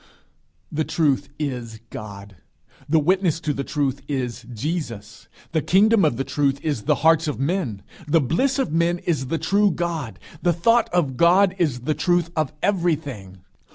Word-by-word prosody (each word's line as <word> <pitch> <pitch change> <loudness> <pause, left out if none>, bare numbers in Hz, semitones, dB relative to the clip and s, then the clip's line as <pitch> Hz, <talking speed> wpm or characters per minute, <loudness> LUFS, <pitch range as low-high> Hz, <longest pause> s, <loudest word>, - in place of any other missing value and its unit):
The 155 +1 0
truth 150 -4 0
is 125 -6 -4
God; 100 -1 -9 0.5
the 160 - +4
witness 175 +1 +2
to 150 - -1
the 140 - -3
truth 140 -2 -2
is 125 -4 -3
Jesus. 115 - -5 0.2
The 160 -1 +1
kingdom 205 +5 +4
of 150 -7 +2
the 135 - -1
truth 140 -1 0
is 145 -9 -2
the - - +3
hearts 165 0 +5
of 150 - -3
men. 135 - -2 0.2
The 165 +2 +4
bliss 250 - +1
of 265 - -1
men 170 +1 +2
is 155 -7 -2
the 165 - -1
true 200 +6 +2
God. 165 -8 -3 0.2
The 175 -1 +2
thought 230 +9 +3
of 145 -8 0
God 180 +4 +4
is 145 -8 0
the 155 +5 0
truth 175 +1 +1
of 155 -4 0
everything. 145 - -1
155 Hz, 165 wpm, -23 LUFS, 130-175 Hz, 0.5 s, hearts